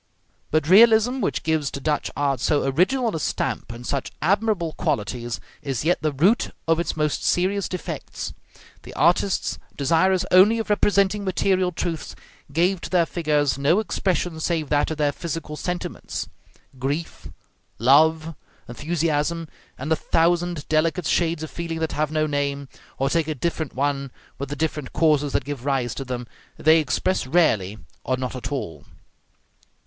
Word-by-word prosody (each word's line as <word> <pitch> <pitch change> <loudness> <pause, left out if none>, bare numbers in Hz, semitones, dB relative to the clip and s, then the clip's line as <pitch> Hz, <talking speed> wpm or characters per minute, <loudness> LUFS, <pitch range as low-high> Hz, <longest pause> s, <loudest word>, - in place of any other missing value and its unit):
But 155 -1 +1
realism, 225 +6 +6
which - - -1
gives 155 -3 0
to - - -6
Dutch 150 +2 -1
art 140 -3 +1
so 145 +4 +1
original 210 - +1
a - - -2
stamp - - -2
and 120 +1 -9
such 140 +1 -2
admirable 195 -2 +1
qualities, 120 +1 -2 0.2
is 135 -1 -3
yet 175 +2 +2
the 155 0 0
root 175 - +2 0.2
of 165 0 +3
its 170 - -2
most 150 -1 0
serious 190 +2 +1
defects. 185 - -5 0.5
The - - -11
artists, 195 - +2 0.2
desirous 170 +6 +2
only 195 +5 +6
of 225 -2 -2
representing 205 0 +2
material 185 -1 +1
truths, 165 -2 -4 0.4
gave 175 +4 +1
to - - -6
their 175 -1 +3
figures 150 -5 0
no 150 +8 +3
expression 180 -5 -1
save 160 -2 -1
that 145 -1 +2
of 160 - -3
their 145 -1 +2
physical 165 0 -5
sentiments. 180 +3 -4 0.5
Grief, 145 +6 -3 0.5
love, 155 +6 +4 0.3
enthusiasm, 155 +3 -1 0.3
and 145 +5 -5
the - - +5
thousand 170 0 +1
delicate 160 +2 +1
shades 165 +1 +1
of 160 - -6
feeling 165 -1 -4
that 160 0 -2
have 155 0 -1
no 155 0 +1
name, 140 -2 -2 0.3
or 135 - +1
take 160 +2 +1
a 155 - -2
different 160 0 -3
one 140 0 -1 0.3
with 140 -1 -4
the 145 - -3
different 150 -3 -3
causes 150 -3 +2
that - - 0
give 140 -4 -5
rise 130 -4 0
to 135 - -5
them, 125 -1 -5 0.3
they 160 +1 +5
express 155 +2 0
rarely, 110 - +2 0.3
or 130 - 0
not 125 0 -4
at 125 +2 -5
all. 105 - -4
155 Hz, 160 wpm, -23 LUFS, 140-175 Hz, 0.5 s, realism